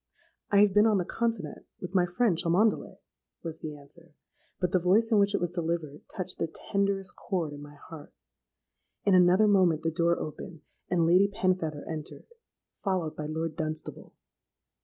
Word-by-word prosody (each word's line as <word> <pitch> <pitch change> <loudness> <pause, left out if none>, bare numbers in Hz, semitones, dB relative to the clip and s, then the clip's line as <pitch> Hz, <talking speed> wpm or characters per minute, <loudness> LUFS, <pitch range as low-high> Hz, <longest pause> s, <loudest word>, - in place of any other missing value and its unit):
'—'I 200 -1 +6
have 205 -2 +4
been 210 +2 +5
on 215 -2 +3
the 180 - -1
continent 230 0 -3
with 180 0 -7
my 180 -2 +3
friend 195 +2 +1
Cholmondeley,' 180 +6 +1 0.5
was 165 -1 -5
the 150 -1 -6
answer: 150 +3 -13 0.4
but 180 -2 0
the 185 - +3
voice 200 +6 +3
in 215 - +5
which 200 0 +3
it - - +1
was 175 -1 -1
delivered 165 -4 -3
touched 185 - -6
the 165 - 0 0.2
tenderest 200 -1 0
chord 170 -6 -3
in 145 - -9
my 145 0 -12
heart. 145 +1 -12 0.9
In 200 - +4
another 185 +3 +5
moment 185 -6 +3
the 165 - 0
door 170 +1 +2
opened, 155 +2 -7 0.3
and 170 -2 +2
Lady 180 +4 +5
Penfeather 185 -7 -1
entered, 155 -2 -6 0.6
followed 185 -6 -1
by 150 - -5
Lord 160 +1 -3
Dunstable. 155 0 -5
175 Hz, 170 wpm, -28 LUFS, 160-195 Hz, 0.9 s, I